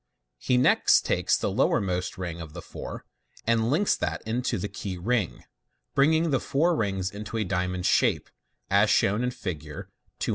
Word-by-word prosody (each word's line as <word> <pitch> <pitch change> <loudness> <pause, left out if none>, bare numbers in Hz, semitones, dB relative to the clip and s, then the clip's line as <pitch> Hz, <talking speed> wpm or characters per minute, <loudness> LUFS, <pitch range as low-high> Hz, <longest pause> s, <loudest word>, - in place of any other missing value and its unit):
He 125 - +1
next 125 - +4
takes - - +2
the - - -1
lowermost 90 -2 0
ring 85 -2 -5
of 80 -2 -9
the 85 - -7
four, - - -8 0.4
and 115 0 +2
links 175 +9 +2
that - - -3
into 120 +3 -1
the 100 - -3
key 95 -2 -6
ring, 110 +1 -1 0.5
bringing 160 +3 +3
the 135 - +2
four 165 +8 +1
rings 95 -6 -1
into 105 +2 -6
a 110 - +1
diamond 90 -1 -2
shape, - - +2 0.4
as - - +4
shown 105 +5 +2
in 125 - +1
Fig 105 -11 -5
240. 75 -1 -9
105 Hz, 170 wpm, -26 LUFS, 90-125 Hz, 0.5 s, next